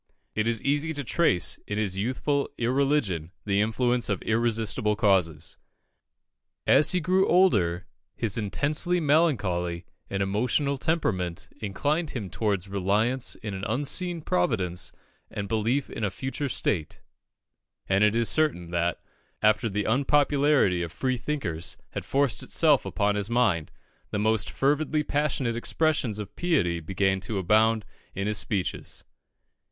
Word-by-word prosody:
It 110 +1 0
is 115 -2 0
easy 145 +3 0
to 145 -2 -4
trace 125 - +1
in 105 - -3
his 100 -3 0
youthful 130 +7 -1
irreligion 120 - 0 0.2
the 100 0 +2
influence 120 +3 +1
of 100 - 0
irresistible 110 -1 +1
causes. 90 -7 +1 1.1
As 150 - +5
he 180 - +1
grew 185 +3 +2
older, 100 - +3 0.3
his 110 -4 -1
intensely 150 - +1
melancholy 105 - +1 0.2
and 100 0 -1
emotional 125 +8 0
temperament 95 - -1
inclined 145 - -1
him 105 -10 -5
towards 100 -1 -1
reliance 105 +6 0
in 105 -2 -4
an 95 0 -6
unseen 160 - -1
Providence 90 -3 0 0.4
and 100 -1 -5
belief 115 +6 0
in - - -6
a 105 - +1
future 135 +7 -4
state; 85 -8 -1 0.9
and 95 +2 +3
it 105 +1 +3
is 115 -1 +3
certain 105 - +1
that, 85 0 -1 0.4
after 110 +2 +3
the 105 +1 -1
unpopularity 140 -5 +2
of 85 -2 -4
freethinkers 125 - -3
had - - -5
forced 140 -4 +1
itself 150 -5 +3
upon 105 -1 +1
his 105 +1 -1
mind, 115 -10 +1 0.4
the - - -3
most 110 0 +1
fervidly 150 +2 +1
passionate 140 -5 0
expressions 135 -2 0
of 105 -2 -7
piety 120 - +1
began 95 +3 0
to 100 +3 -3
abound 110 +3 +3 0.3
in 100 - -2
his 105 -1 +1
speeches. 100 -4 -3
110 Hz, 135 wpm, -26 LUFS, 95-140 Hz, 1.1 s, As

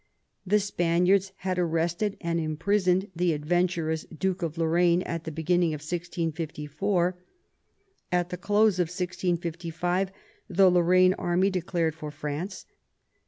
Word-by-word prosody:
The 210 +3 +4
Spaniards 185 0 +2
had 185 -1 -2
arrested 170 +4 0
and 170 0 -1
imprisoned 185 +4 +1
the 175 0 +2
adventurous 160 +1 0
Duke 185 +3 -2
of 165 -1 -3
Lorraine 170 +2 +3
at 165 -1 -4
the 160 - -4
beginning 165 +1 +1
of 150 - -9
1654. 170 +2 -2 0.9
At 175 -1 +1
the 180 - -4
close 205 +1 +2
of 175 - +2
1655 175 0 -2 0.4
the 185 0 +5
Lorraine 180 +1 +5
army 185 +2 +2
declared 175 -3 -1
for 155 -1 -7
France. 150 +6 -5
175 Hz, 120 wpm, -27 LUFS, 165-185 Hz, 0.9 s, the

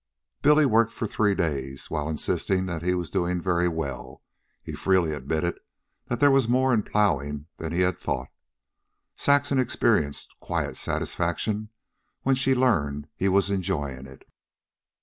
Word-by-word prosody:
Billy 150 +1 +5
worked 115 -2 +3
for - - -4
three 105 -1 +1
days, 70 -5 -2
and - - -14
while 75 0 -2
insisting 95 +4 0
that 85 -4 -4
he 90 +1 +1
was 90 -2 -4
doing 90 -1 0
very 90 0 +1
well, 80 -7 -5 0.4
he - - -7
freely 90 -5 +2
admitted 80 +4 -2 0.5
that 120 - -2
there 145 +1 +6
was 135 -4 +3
more 130 +2 +3
in 110 - +3
plowing 75 -9 0
than 80 -1 -5
he 85 +2 0
had 90 0 +1
thought. 65 -2 -3 0.9
Saxon 140 -1 +2
experienced 105 - 0
quiet - - -3
satisfaction 105 +5 -2 0.5
when 135 - +3
she 130 0 +2
learned 75 - +1
he 95 - +1
was 100 +1 +2
enjoying 70 -9 -2
it. 65 0 -16
90 Hz, 150 wpm, -26 LUFS, 75-110 Hz, 0.9 s, there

